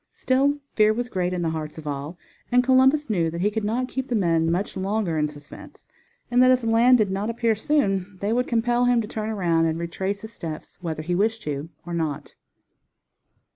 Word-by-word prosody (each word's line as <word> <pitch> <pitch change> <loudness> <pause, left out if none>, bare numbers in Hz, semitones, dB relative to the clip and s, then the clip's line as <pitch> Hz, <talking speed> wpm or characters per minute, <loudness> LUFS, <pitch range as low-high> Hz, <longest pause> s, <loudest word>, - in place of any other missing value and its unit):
Still 275 +3 +1 0.2
fear 215 0 +4
was 245 +1 -3
great 180 -5 -1
in 180 -1 -2
the 165 - 0
hearts 155 -1 -5
of 160 - -9
all, 145 +3 -5 0.3
and 250 0 +4
Columbus 265 +3 +4
knew 175 -7 +1
that 170 +1 -5
he 205 +3 +2
could 220 0 -2
not 235 +5 -1
keep 265 0 -4
the 245 - -1
men 165 -5 +2
much 190 +6 -2
longer 195 -2 -1
in 150 -1 +1
suspense, 145 -1 -13 0.4
and 245 +1 +4
that 255 - +6
if 255 -1 +3
land 230 +3 +5
did 210 -4 +1
not 200 +3 -2
appear 230 -1 +1
soon 200 -6 0
they 205 +3 0
would 250 +2 +1
compel 240 +1 +1
him 245 -1 +3
to 215 - -6
turn 215 0 -4
around 170 -6 +1
and 160 0 -1
retrace 190 +4 -3
his 220 +1 -9
steps 160 -6 -8
whether 160 -3 -4
he 175 +3 -2
wished 220 +4 0
to 145 +1 -4 0.2
or 175 - -6
not. 160 -4 -3
205 Hz, 210 wpm, -24 LUFS, 165-240 Hz, 0.4 s, that